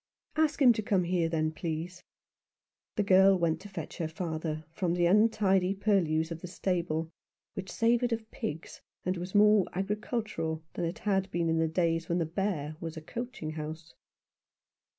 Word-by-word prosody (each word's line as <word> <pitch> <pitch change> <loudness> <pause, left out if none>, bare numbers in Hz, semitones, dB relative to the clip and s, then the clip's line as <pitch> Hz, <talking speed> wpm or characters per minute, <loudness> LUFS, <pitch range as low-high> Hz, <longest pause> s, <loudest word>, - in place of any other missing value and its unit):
"Ask 310 -2 +2
him 255 -4 +7
to 215 - -2
come 195 -3 +1
here, 170 -1 +1
then, 155 -1 0
please." 165 +2 -5 0.9
The 210 - +1
girl 190 0 +6
went 170 -2 +1
to 205 - -10
fetch 180 -5 -7
her. 165 - 0
father 160 -1 -4
from 170 +1 -1
the 175 -1 +2
untidy 195 -1 +3
purlieus 175 -6 +1
of 165 0 -5
the - - -6
stable, 170 -3 -1 0.4
which 190 -1 -6
savoured 235 +1 +2
of 225 -1 -3
pigs, 155 +2 -6 0.2
and 185 +1 +1
was 180 +3 -6
more 210 -2 +6
agricultural 200 -4 -2
than - - -2
it 170 - -3
had 195 -2 0
been 170 -2 0
in 160 0 +2
the 160 - +2
days 165 0 0
when 170 - +1
the 170 - +1
Bear 160 -3 -2
was 165 -1 -6
a - - -5
coaching 240 -6 -5
house. 155 +1 -7
180 Hz, 170 wpm, -30 LUFS, 160-200 Hz, 0.9 s, him